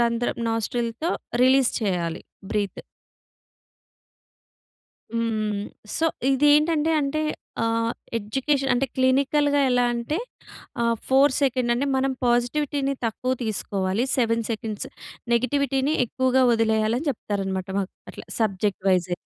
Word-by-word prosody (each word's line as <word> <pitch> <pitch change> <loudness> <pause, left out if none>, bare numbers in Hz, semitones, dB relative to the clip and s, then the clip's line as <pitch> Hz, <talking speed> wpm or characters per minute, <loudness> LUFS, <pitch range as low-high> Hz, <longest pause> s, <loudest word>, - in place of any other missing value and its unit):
రంధ్రం 235 0 0
నాస్ట్రిల్‌తో 230 - -1 0.3
రిలీజ్ 260 0 +5
చెయ్యాలి, 175 -5 -1 0.3
బ్రీత్. 205 -2 -2 2.3
హ్మ్, 230 0 -1
హ్మ్. 210 -1 -2 0.3
సో, 325 - +2 0.2
ఇదేంటంటే 295 +3 +4
అంటే, 295 +2 -1 0.4
ఆహ్, 230 0 +1 0.3
ఎడ్యుకేషన్ 270 +5 0
అంటే, 270 +2 +1
క్లినికల్‌గా 280 +2 +3
ఎలా 245 0 +3
అంటే, 235 +8 -2 0.7
ఆహ్, 235 0 +2
4 270 +1 +5
సెకండ్ 255 -3 +1
అంటే, 280 +4 0
మనం 270 0 +1 0.2
పాజిటివిటీని 275 +3 +1
తక్కువ 255 +3 -2
తీసుకోవాలి. 200 0 -1
7 230 -1 +2
సెకండ్స్ 215 -2 -4 0.5
నెగటివిటీని 270 +3 +1
ఎక్కువగా 260 +1 +2
ఒదిలెయ్యాలని 225 +4 +1
చెప్తారనమాట 195 -4 -3
మాకు, 195 - -4 0.2
అట్లా - - -10
సబ్జెక్ట్ 200 -3 0
వైసె. 180 -1 +2
240 Hz, 105 wpm, -24 LUFS, 220-275 Hz, 2.3 s, రిలీజ్